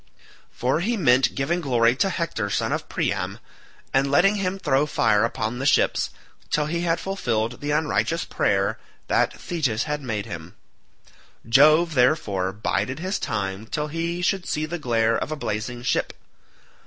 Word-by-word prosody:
For 130 +5 0
he 225 +7 0
meant 130 -7 +3
giving 170 +6 0
glory 120 -4 +3
to 195 - +2
Hector 165 - -2
son - - -1
of - - -3
Priam, - - -2 0.6
and 135 +1 +2
letting 195 +9 +4
him 190 -1 -1
throw 150 -5 +1
fire 110 -6 +2
upon 115 +1 -2
the 135 - -3
ships, - - +2 0.4
till 150 - +1
he 170 +3 -2
had 170 -1 +1
fulfilled 120 - -2
the 145 - -3
unrighteous 160 +2 0
prayer 100 +2 0 0.3
that - - +1
Thetis 135 -10 -1
had 150 -1 -3
made 110 -6 -3
him; 85 -5 -8 0.9
Jove, 155 +7 +5
therefore, 110 - +2
bided 110 +5 -2
his 185 +4 -2
time 100 0 -3
till 150 +3 -3
he 170 +3 -3
should 185 0 0
see 155 +1 -1
the 170 +2 -5
glare 115 -4 +1
of - - -4
a - - -1
blazing 120 -2 -4
ship. - - 0
135 Hz, 160 wpm, -24 LUFS, 115-165 Hz, 0.9 s, Jove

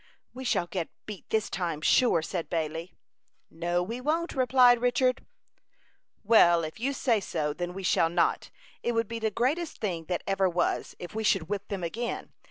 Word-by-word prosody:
"We 260 +1 -7
shall 180 - +1
get 175 -1 -4 0.2
beat 210 -3 -9
this 220 -1 +1
time, 170 -4 -3
sure," 170 -2 +4
said 170 0 -4
Bailey. 165 +1 -3 0.6
"No, 175 +2 -1
we 230 +7 -5
won't," 325 +5 -1
replied 250 -2 +5
Richard. 255 +1 +2 1.0
"Well, 175 -6 +5
if 155 +7 -6
you 265 +4 0
say 245 -5 +1
so, 155 -6 -2
then 175 +3 -5
we 195 - -6
shall 165 -2 +3
not. 170 0 +1 0.3
It 240 - -1
would 230 -1 0
be 230 +1 -5
the 220 -1 0
greatest 295 - -1
thing 175 -6 -3
that 180 +1 -2
ever 195 -1 +2
was, 175 0 -1
if 175 - -8
we 220 +1 -3
should 190 -5 +1
whip 205 -1 -3
them 195 -3 -4
again. 230 +8 -4
195 Hz, 180 wpm, -28 LUFS, 170-240 Hz, 1.0 s, replied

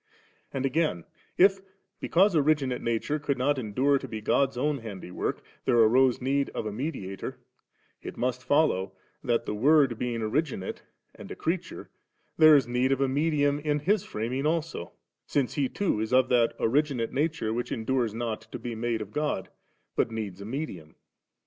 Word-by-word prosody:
And 135 -1 -2
again, 135 - 0 0.3
if 195 +1 +5 0.4
because 190 +2 +3
originate 145 -4 +2
nature 115 +6 -1
could 145 -1 -1
not 135 +2 +1
endure 130 +5 +1
to - - -7
be 110 - -5
God's 135 +4 +1
own 145 +2 0
handywork, 95 -5 -4 0.2
there 125 -2 +3
arose 120 +3 +5
need 140 +2 0
of - - -3
a 105 - -2
mediator*, 100 -6 -5 0.6
it - - -8
must 125 0 -1
follow, 145 -11 +2 0.3
that, 120 -1 +1
the - - -3
Word 135 +1 +3
being 120 -2 -2
originate 125 - -2 0.3
and - - -11
a - - -6
creatore^ 170 +2 -3 0.5
there 155 -1 +8
is 135 -5 +3
need 125 +2 +1
of 135 - +2
medium 145 0 +1
in 150 -1 -1
tfis 200 +5 +2
framing 125 - -3
also^ 160 - -1 0.4
since 140 -4 0
He 140 -3 0
too 200 - -1
is 110 +2 -2
of 130 0 +4
that 120 -2 +3
originate 130 -1 +1
nature 145 -6 0
which 120 +1 -3
endures 115 -1 -1
not 115 -2 -3
to - - -4
be 120 0 -5
made 115 0 -2
of 105 - -14
God, 150 -11 -2 0.5
but - - +1
needs 105 -4 -5
a - - -7
medium. 105 - -6
130 Hz, 170 wpm, -27 LUFS, 115-150 Hz, 0.6 s, there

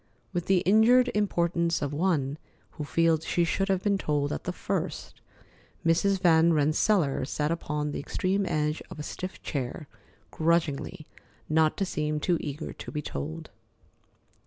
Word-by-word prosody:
With 175 -1 -2
the 190 -2 +4
injured 235 +6 +5
importance 170 -4 +1
of 145 0 -2
one 150 -4 0 0.3
who 150 - -6
feels 165 +1 +2
she 175 - +1
should 195 +3 0
have 190 -1 +1
been 200 -2 +2
told 145 -3 0
at 75 - -5
the - - -1
first, - - -4 0.6
Mrs. 190 +4 +3
Van 170 -2 +5
Rensselaer 155 +1 +2
sat 150 +2 -1
down - - +2
upon 150 -2 -3
the - - -4
extreme 190 +7 -1
edge 150 0 0
of - - -9
a 150 - -5
stiff 185 +4 -6
chair, 140 +2 -4 0.4
grudgingly, 165 0 0 0.4
not 155 0 +2
to 195 - 0
seem 150 -3 -2
too 170 +1 +1
eager 150 +1 -5
to - - -9
be 150 -1 -4
told. 75 - -6
165 Hz, 160 wpm, -28 LUFS, 150-185 Hz, 0.6 s, injured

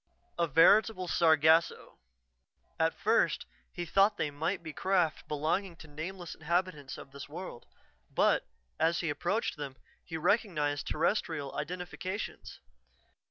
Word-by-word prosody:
A 170 - +3
veritable 185 +5 +5
sargasso. 160 0 +3 0.8
At - - +1
first, - - +2 0.3
he 175 - -5
thought 200 +4 +3
they 150 - -1
might 160 +5 -2
be 160 -2 -7
craft 180 -4 0
belonging 165 +5 -1
to 160 - -13
nameless 170 +4 -6
inhabitants 165 -3 -2
of 135 - -11
this 140 0 -9
world, 155 -5 -8 0.4
but, - - +2 0.3
as 165 +1 +2
he 165 -4 -1
approached 175 +9 -1
them, 140 -3 -6 0.3
he 165 - -5
recognized 160 - +1
Terrestrial 155 -4 -1
identifications. 180 +3 -5
165 Hz, 120 wpm, -31 LUFS, 150-185 Hz, 0.8 s, veritable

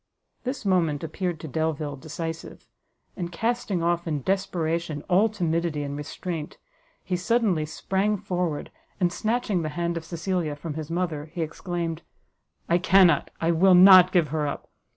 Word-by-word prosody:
This 255 -2 -4
moment 170 -6 +1
appeared 170 +1 -3
to 160 - -6
Delvile 155 0 -2
decisive; 160 +3 -7 0.5
and 175 -2 -4
casting 210 -2 -1
off 170 0 0
in 150 -4 -2
desperation 170 -5 -1
all 195 +5 +4
timidity 170 -6 -1
and 140 0 -4
restraint, 155 +2 -5 0.5
he 180 - -2
suddenly 185 -5 +1
sprang 195 +6 -1
forward, 175 -5 -3 0.3
and 175 -2 +1
snatching 220 -4 0
the 155 - -2
hand 170 0 -1
of 165 - -5
Cecilia 170 -3 -2
from 150 +1 -6
his 155 0 -6
mother, 165 -4 -2
he 165 +2 -4
exclaimed, 165 0 -4 0.7
"I 170 +1 +3
cannot, 180 -4 +4
I 165 +1 +2
will 180 +3 +5
not 185 0 +9
give 170 -5 +2
her 150 0 -1
up! 140 - -6
170 Hz, 150 wpm, -25 LUFS, 155-185 Hz, 0.7 s, not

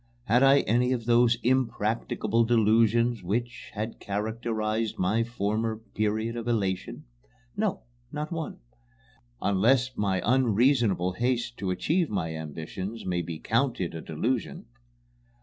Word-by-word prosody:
Had 120 +1 +3
I 135 +1 +6
any 125 +3 +2
of 120 -3 -3
those 120 0 +4
impracticable 115 -2 +1
delusions 115 +1 +3
which 120 +7 -3
had 110 +2 -4
characterized 110 +1 -2
my 110 +5 +1
former 110 -1 -2
period 110 +1 -2
of 120 0 -5
elation? 100 -6 -1 0.5
No, 210 -2 -1 0.3
not 150 +1 -4
one 165 -2 -4 0.9
unless 120 +6 +3
an 95 -3 0
unreasonable 115 -5 +3
haste 120 +3 -1
to 95 - -3
achieve 160 - 0
my 80 -6 -2
ambitions 80 +8 -6
may 90 -1 0
be 85 -1 -5
counted 115 - 0
a 80 - -6
delusion. 110 +11 -2
115 Hz, 120 wpm, -27 LUFS, 100-120 Hz, 0.9 s, I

